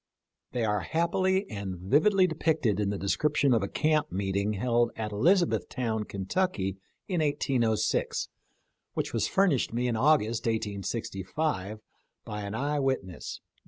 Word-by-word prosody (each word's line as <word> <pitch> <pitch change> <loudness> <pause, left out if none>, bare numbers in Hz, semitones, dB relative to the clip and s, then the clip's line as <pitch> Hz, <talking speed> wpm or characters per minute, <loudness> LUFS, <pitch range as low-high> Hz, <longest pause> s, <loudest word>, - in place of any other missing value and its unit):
They 120 -2 0
are 105 -1 +1
happily 185 - +1
and 100 -3 -5
vividly 155 - +4
depicted 160 - +1
in 100 -1 +1
the 100 - -2
description 140 +7 +2
of 115 - +3
a 100 - -1
camp 155 +5 +1
meet 95 0 -2
ing 100 +2 +1
held 120 +3 +2
at 110 -1 -4
Elizabethtown, 120 - +1
Kentucky, 100 - -1 0.3
in 180 -5 0
1806, 125 -7 +1 0.7
which - - -2
was - - +1
furnished 180 -13 +2
me 125 +1 0
in 120 - 0
August, 115 -4 +2
1865, 110 - -2 0.4
by 105 0 -5
an 100 +1 -4
eye 145 +4 0
wit 135 -4 +1
ness. 90 -2 -8
115 Hz, 140 wpm, -28 LUFS, 100-155 Hz, 0.7 s, vividly